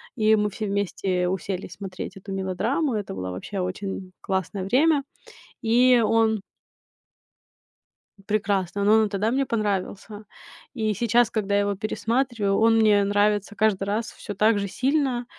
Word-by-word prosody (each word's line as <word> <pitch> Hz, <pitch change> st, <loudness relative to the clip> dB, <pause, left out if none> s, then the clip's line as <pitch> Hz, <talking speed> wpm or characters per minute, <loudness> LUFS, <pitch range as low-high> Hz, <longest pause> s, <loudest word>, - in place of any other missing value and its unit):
и 220 Hz, -1 st, +4 dB
мы 210 Hz, -1 st, +1 dB
все 215 Hz, +2 st, -5 dB
вместе 195 Hz, -2 st, -1 dB
уселись 185 Hz, 0 st, -4 dB
смотреть 195 Hz, 0 st, -7 dB
эту 195 Hz, +1 st, -9 dB
мелодраму. 205 Hz, -, -1 dB
Это 205 Hz, -, -4 dB
была 90 Hz, -1 st, -5 dB
вообще 190 Hz, -, -6 dB
очень 185 Hz, +1 st, -4 dB
классное 190 Hz, 0 st, -2 dB
время. 280 Hz, +7 st, +3 dB, 0.6 s
И 245 Hz, +1 st, +4 dB
он 220 Hz, -1 st, +2 dB, 1.9 s
Прекрасный, 200 Hz, -2 st, 0 dB
но 205 Hz, -, +4 dB
он 220 Hz, 0 st, +5 dB
и -, -, -9 dB
тогда 205 Hz, +2 st, 0 dB
мне 270 Hz, +2 st, +1 dB
понравился. 210 Hz, -1 st, -3 dB, 0.5 s
И 220 Hz, -3 st, 0 dB
сейчас, 235 Hz, +3 st, +2 dB
когда 205 Hz, -2 st, -1 dB
я 205 Hz, -, +3 dB
его 200 Hz, 0 st, -1 dB
пересматриваю, 220 Hz, 0 st, -1 dB
он 225 Hz, 0 st, +4 dB
мне 210 Hz, -2 st, +4 dB
нравится 205 Hz, +1 st, +1 dB
каждый 205 Hz, -3 st, +1 dB
раз 220 Hz, +3 st, -2 dB
всё 205 Hz, -, -8 dB
так 210 Hz, +1 st, +3 dB
же 200 Hz, -, -2 dB
сильно. 260 Hz, +3 st, 0 dB
205 Hz, 150 wpm, -24 LUFS, 195-225 Hz, 1.9 s, он